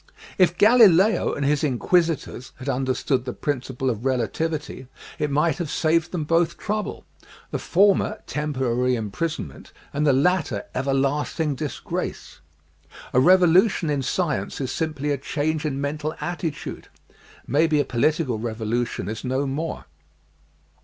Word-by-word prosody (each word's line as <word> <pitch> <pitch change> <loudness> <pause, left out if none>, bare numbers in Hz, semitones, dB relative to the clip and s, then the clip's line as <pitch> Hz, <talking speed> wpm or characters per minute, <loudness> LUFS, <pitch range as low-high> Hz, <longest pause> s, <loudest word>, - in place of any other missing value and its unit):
If 175 -1 +4
Galileo 215 -3 +5
and 140 - -2
his 145 +1 +1
inquisitors 155 -1 0
had 130 +1 -10
understood 130 0 0
the 125 - -4
Prin 145 -4 -2
ciple 130 0 -4
of 115 -3 -1
Relativity 135 +3 -2 0.3
it 150 - 0
might 155 +4 +1
have 170 -4 -3
saved 165 +2 +1
them 175 -4 -2
both 165 +2 +1
trouble; 210 0 -3 0.5
the - - -2
former 200 +3 +2
temporary 130 -4 0
imprisonment 110 - -4 0.2
and 150 +1 +1
the - - +6
latter 140 - +1
everlasting 140 +3 0
disgrace. 140 - -5 0.7
A 125 - +5
revolution 180 - +4
in 145 -2 0
science 135 - -2
is 130 -3 -2
simply 150 -3 -2
a 140 - -1
change 155 +2 -2
in 140 -3 -2
mental 150 +2 -3
attitude. 165 -3 -5 0.6
Maybe 150 +2 +2
a 145 - +2
political 130 0 0
revolution 115 +1 -2
is 110 +2 -5
no 130 +2 -1
more. 150 +4 -4
145 Hz, 130 wpm, -23 LUFS, 130-165 Hz, 0.7 s, the